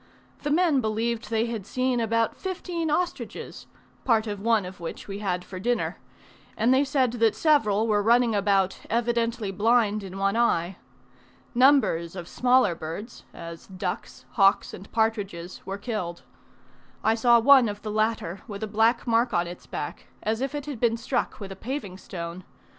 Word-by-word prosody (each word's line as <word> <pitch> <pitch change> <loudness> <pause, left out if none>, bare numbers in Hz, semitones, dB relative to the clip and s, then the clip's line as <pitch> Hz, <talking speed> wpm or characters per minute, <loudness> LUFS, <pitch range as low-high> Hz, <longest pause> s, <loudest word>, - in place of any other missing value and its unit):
The 295 - -2
men 310 -3 +3
believed 225 0 -2
they 225 0 +1
had 230 -4 -4
seen 255 +4 0
about 230 0 +1
fifteen 355 -3 -3
ostriches 345 +4 -3 0.4
(part 225 -3 +3
of 205 -2 -4
one 220 -1 +2
of 185 +1 -9
which 170 -1 -7
we 200 0 -5
had 180 -3 -2
for 185 - -8
dinner); 240 +5 -1 0.6
and 235 +4 +3
they 265 +2 +4
said 265 -3 +1
that 230 -2 +2
several 225 -9 +3
were 210 -2 +2
running 235 +2 +4
about 195 -2 +2
evidently 235 -2 0
blind 215 +1 +2
in 190 -1 -8
one 195 +2 +1
eye. 190 -6 +1 0.8
Numbers 245 - +3
of 175 -2 -7
smaller 250 -5 +3
birds, 170 +8 -7
as 170 -1 -9
ducks, 185 -1 -5
hawks, 195 -2 +3
and 195 - -10
partridges, 205 -6 -1
were 195 +1 -3
killed. 200 -6 -4 0.8
I 220 - +4
saw 235 +1 +5
one 255 -1 +6
of 205 0 -7
the 215 - -3
latter 215 -4 -1
with 205 -1 -6
a - - -2
black 225 +3 +2
mark 235 -1 +2
on 175 0 +2
its 175 +1 -9
back, 145 - -6 0.2
as 220 +2 -1
if 275 +2 -2
it 290 -2 -4
had 285 -6 -6
been 230 -1 +2
struck 230 - -2
with 195 -2 -7
a - - -6
paving 205 -4 -5
stone. 170 -1 -7
220 Hz, 170 wpm, -26 LUFS, 195-240 Hz, 0.8 s, one